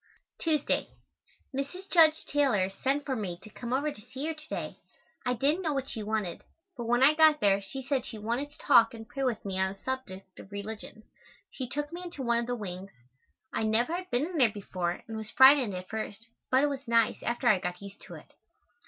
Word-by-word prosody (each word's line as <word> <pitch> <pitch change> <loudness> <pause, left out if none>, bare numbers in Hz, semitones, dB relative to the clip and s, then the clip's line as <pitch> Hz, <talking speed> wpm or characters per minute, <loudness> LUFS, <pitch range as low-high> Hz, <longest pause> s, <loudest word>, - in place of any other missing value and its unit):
Tuesday. 310 -3 +1 0.7
Mrs. 320 +8 -4
Judge 320 -2 +6
Taylor 250 -10 +2
sent 275 +8 -1
for 265 - -1
me 190 -7 -3
to 215 - -12
come 240 +3 -7
over 285 +4 +1
to 210 - -12
see 265 +6 -6
her 320 - -1
to 305 0 -12
day. - - -4 0.5
I 250 - +2
didn't 290 +9 +1
know 320 -4 0
what 270 -1 -2
she 225 - -4
wanted, 210 -4 -2 0.3
but 240 -3 -5
when 240 +2 +3
I 290 +3 +7
got 310 -1 +6
there 200 -1 +3
she 260 +8 -7
said 265 -1 0
she 230 - -7
wanted 235 +7 -2
to - - -20
talk 230 -5 +5
and 225 -1 -10
pray 275 - -6
with 240 -5 -1
me 190 -1 -2
on 190 0 +1
the 195 - -21
subject 195 -8 -6
of 190 - -12
religion. 215 +1 -7 0.5
She 255 -3 -5
took 295 +3 -3
me 350 - -5
into 345 -6 -6
one 235 -1 +2
of 235 - -3
the 245 - -1
wings. 195 -3 -7 0.6
I - - -1
never 225 +7 +2
had 365 +1 -4
been 255 -1 +1
in 350 0 -5
there 245 -4 +6
before 185 -4 -4
and 225 -1 -5
was 220 -1 -6
frightened 265 -6 +6
at 180 0 -6
first, 220 0 -5 0.2
but 260 +2 +4
it - - +4
was 275 -2 -5
nice 230 -1 +2
after 240 +1 -1
I 210 -5 +5
got 180 -1 -4
used 200 0 -11
to - - -9
it. - - -14
240 Hz, 225 wpm, -29 LUFS, 210-285 Hz, 0.7 s, I